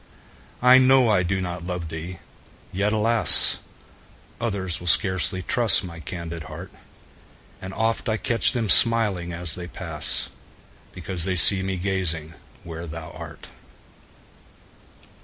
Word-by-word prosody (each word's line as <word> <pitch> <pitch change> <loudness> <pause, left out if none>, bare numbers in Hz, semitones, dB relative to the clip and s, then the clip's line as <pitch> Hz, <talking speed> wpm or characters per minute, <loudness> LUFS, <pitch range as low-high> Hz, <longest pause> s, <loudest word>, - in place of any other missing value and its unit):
I 125 +1 +5
know 130 -2 +2
I 100 -3 +1
do 95 +2 -4
not 90 -2 -7
love 90 -3 -7
thee! 80 +3 -9 0.6
yet, 100 +3 -2
alas! 110 -2 +4 0.8
Others 95 -7 -3
will 90 - -11
scarcely 95 +2 +1
trust 115 0 +3
my 85 -2 -11
candid 85 0 -9
heart; - - -12 0.9
And 95 - -9
oft 115 +2 -3
I 110 - -2
catch 115 +1 0
them 120 -4 -4
smiling 105 -5 +5
as 85 -2 0
they 90 -1 -6
pass, - - -2 0.6
Because 90 -1 +1
they 95 -1 -2
see 95 +2 +4
me 95 0 -5
gazing 85 -4 -2 0.3
where 85 0 -10
thou 80 0 -10
art. - - -13
95 Hz, 130 wpm, -21 LUFS, 85-105 Hz, 0.9 s, I